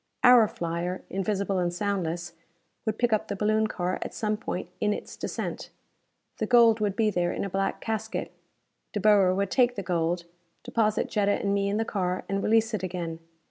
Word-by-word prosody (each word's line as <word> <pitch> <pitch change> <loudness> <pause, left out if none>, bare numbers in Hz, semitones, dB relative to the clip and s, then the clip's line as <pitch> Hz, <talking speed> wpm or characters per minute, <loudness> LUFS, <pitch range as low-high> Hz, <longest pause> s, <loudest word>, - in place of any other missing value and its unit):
Our 245 -3 +8
flyer, 170 +1 -3
invisible 195 0 -1
and 175 -1 0
soundless, 175 -3 -2 0.5
would 220 0 0
pick 240 -2 +2
up 215 - +1
the 200 - -3
baloon 215 +2 +2
car 180 -3 -2
at - - -5
some 215 -1 0
point 185 -4 -4
in 210 0 +2
its - - -7
descent. - - -4 0.7
The 220 - 0
gold 230 -2 +6
would 205 -2 0
be 215 -1 +2
there, 175 -2 0
in - - -3
a 195 - -5
black 195 +1 -1
casket. 220 0 -3 0.6
De 210 - -1
Boer 195 -3 +5
would 200 0 -1
take 245 -2 +3
the 200 - -4
gold, 170 -1 0 0.4
deposit 215 -2 +1
Jetta 205 -1 +1
and 200 -1 0
me 200 0 +1
in 205 - 0
the 225 - 0
car, 185 -4 -2
and 195 0 -1
release 225 +2 +2
it 210 - -1
again. 170 -3 -4
200 Hz, 190 wpm, -27 LUFS, 180-215 Hz, 0.7 s, Our